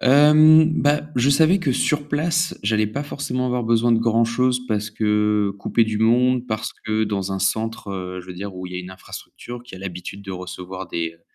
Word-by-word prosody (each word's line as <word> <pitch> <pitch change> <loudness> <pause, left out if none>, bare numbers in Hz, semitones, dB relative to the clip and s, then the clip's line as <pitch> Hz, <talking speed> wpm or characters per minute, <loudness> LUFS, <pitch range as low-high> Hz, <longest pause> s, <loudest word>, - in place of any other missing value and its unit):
Hem, 155 +4 +6
bah, 145 +1 +2
je 125 +3 +3
savais 160 +7 +4
que 160 -8 0
sur 145 +3 0
place, 160 +3 0
j'allais 105 +1 +1
pas 125 +7 -4
forcément 135 -3 -3
avoir 125 -2 -1
besoin 115 +1 +2
de 115 - +3
grand-chose 120 +2 +1
parce 105 -2 -2
que 105 -1 +1
couper 115 +3 +1
du 110 -1 -3
monde, 125 +2 +2
parce 110 -2 -3
que 110 0 -2
dans 100 -2 -3
un 95 - -2
centre, 110 +2 -2
heu, 90 -1 -5
je 90 - -15
veux 90 - -8
dire 95 +2 -7
où 90 0 -7
il 90 - -10
y - - -4
a - - -3
une 90 +1 -8
infrastructure, 120 +5 -10
qui 125 -5 -12
a 95 - -10
l'habitude 95 +1 -7
de 100 - -8
recevoir 90 0 -7
des, 85 -1 -3
heu, - - -37
110 Hz, 215 wpm, -21 LUFS, 100-130 Hz, -, Hem